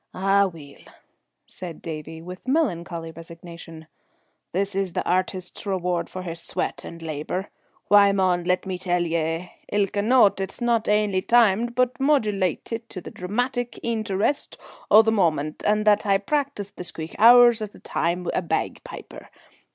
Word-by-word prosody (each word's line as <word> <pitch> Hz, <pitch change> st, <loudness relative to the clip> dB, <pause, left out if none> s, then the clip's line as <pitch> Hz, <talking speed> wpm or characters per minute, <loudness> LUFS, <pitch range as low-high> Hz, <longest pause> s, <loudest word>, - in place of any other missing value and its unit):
"Ah 195 Hz, +1 st, +3 dB
weel!" 155 Hz, -6 st, -12 dB, 0.7 s
said 175 Hz, -3 st, -9 dB
Davie, 160 Hz, 0 st, -7 dB
with 180 Hz, +6 st, -10 dB
melancholy 175 Hz, -, -1 dB
resignation, 165 Hz, 0 st, -11 dB, 0.7 s
"this 200 Hz, +2 st, -1 dB
is 190 Hz, -2 st, -1 dB
the -, -, -2 dB
artist's 185 Hz, 0 st, -2 dB
reward 180 Hz, -3 st, -1 dB
for 185 Hz, -, -7 dB
his 170 Hz, -2 st, -4 dB
sweat -, -, -2 dB
and 170 Hz, 0 st, -9 dB
labour. 160 Hz, +5 st, -4 dB, 0.4 s
Why, 205 Hz, -1 st, +6 dB
mon, 185 Hz, -3 st, +1 dB
let 180 Hz, +2 st, +1 dB
me 185 Hz, -1 st, -4 dB
tell 175 Hz, -1 st, 0 dB
ye, 165 Hz, +1 st, -2 dB, 0.2 s
ilka 200 Hz, 0 st, +1 dB
note 215 Hz, -3 st, +4 dB
is 190 Hz, 0 st, -4 dB
not 235 Hz, -2 st, +1 dB
ainly 210 Hz, -3 st, +2 dB
timed 235 Hz, +1 st, +3 dB
but 250 Hz, 0 st, +1 dB
modulatit 225 Hz, -, 0 dB
to 185 Hz, -, -7 dB
the -, -, -10 dB
dramatic 245 Hz, +6 st, -3 dB
eenterest 220 Hz, +2 st, -1 dB, 0.3 s
o' 215 Hz, +2 st, +8 dB
the 220 Hz, -, +2 dB
moment, 155 Hz, -7 st, 0 dB
and 210 Hz, 0 st, +2 dB
that 210 Hz, -1 st, +4 dB
I 200 Hz, -, +4 dB
hae -, -, +5 dB
practised 265 Hz, -2 st, -3 dB
the -, -, -5 dB
squeak 160 Hz, -2 st, -6 dB
hours 240 Hz, 0 st, +7 dB
at 210 Hz, -1 st, -6 dB
a -, -, -14 dB
time 170 Hz, +2 st, -2 dB
wi' -, -, -2 dB
a -, -, 0 dB
bagpiper. -, -, -5 dB
190 Hz, 160 wpm, -24 LUFS, 170-220 Hz, 0.7 s, o